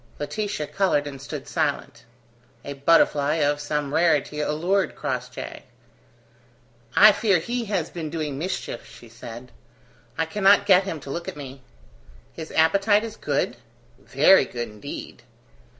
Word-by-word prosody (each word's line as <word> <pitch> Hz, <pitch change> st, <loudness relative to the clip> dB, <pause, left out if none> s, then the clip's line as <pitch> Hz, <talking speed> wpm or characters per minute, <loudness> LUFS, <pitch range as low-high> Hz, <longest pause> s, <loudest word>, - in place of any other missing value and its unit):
Laetitia 200 Hz, +1 st, -3 dB
coloured 185 Hz, -5 st, 0 dB
and 140 Hz, -2 st, -8 dB
stood 140 Hz, 0 st, -7 dB
silent. -, -, -2 dB, 0.6 s
A 140 Hz, -, -5 dB
butterfly 145 Hz, 0 st, +3 dB
of 145 Hz, -2 st, +1 dB
some 145 Hz, -1 st, -3 dB
rarity 150 Hz, -3 st, +2 dB
allured 175 Hz, +6 st, 0 dB
Crossjay. 125 Hz, -3 st, -5 dB, 1.3 s
"I 215 Hz, +1 st, +9 dB
fear 200 Hz, -2 st, +2 dB
he 235 Hz, +8 st, -3 dB
has 190 Hz, -6 st, -2 dB
been 160 Hz, -3 st, -5 dB
doing 150 Hz, -4 st, -4 dB
mischief," 170 Hz, -8 st, -4 dB
she 120 Hz, -, -14 dB
said. 115 Hz, +2 st, -10 dB, 0.7 s
"I 160 Hz, -, +1 dB
cannot 200 Hz, +3 st, +4 dB
get 190 Hz, -1 st, +5 dB
him 165 Hz, -5 st, -4 dB
to 135 Hz, -, -8 dB
look 170 Hz, +3 st, -5 dB
at -, -, -6 dB
me." 135 Hz, -2 st, -9 dB, 0.7 s
"His 160 Hz, -1 st, -8 dB
appetite 200 Hz, +6 st, +3 dB
is 225 Hz, -2 st, -6 dB
good?" -, -, -2 dB, 0.4 s
"Very 190 Hz, -8 st, +4 dB
good 120 Hz, -2 st, -5 dB
indeed." 105 Hz, -1 st, -9 dB
155 Hz, 135 wpm, -24 LUFS, 140-190 Hz, 1.3 s, I